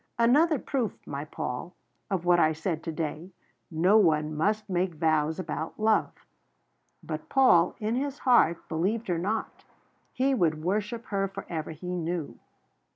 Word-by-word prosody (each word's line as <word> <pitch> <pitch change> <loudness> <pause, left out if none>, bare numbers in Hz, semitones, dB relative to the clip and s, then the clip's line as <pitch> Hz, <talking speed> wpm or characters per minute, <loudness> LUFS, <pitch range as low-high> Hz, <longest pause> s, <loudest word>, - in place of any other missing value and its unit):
"Another 290 +7 +4
proof, 250 -4 -2
my 140 +1 -5
Paul, 135 +3 -5 0.3
of 185 -3 -2
what 175 0 +5
I 155 -1 +4
said 160 0 -3
today 160 +1 -4 0.4
no 180 +6 +4
one 155 -5 +2
must 210 +7 0
make 180 -2 -1
vows 155 -1 +1
about 170 -2 -5
love." 220 0 +2 0.9
But - - -6
Paul, 180 -11 +4
in 215 0 -1
his 275 +2 -2
heart, 240 - +3
believed 195 +7 -1
her 170 -2 0
not. 210 +5 -3 0.5
He 270 +2 +1
would 160 -9 +1
worship 210 +5 -2
her 195 -1 0
for 195 - -8
ever, 160 -2 -4
he 180 +3 -6
knew. 170 -2 -4
180 Hz, 150 wpm, -28 LUFS, 160-215 Hz, 0.9 s, what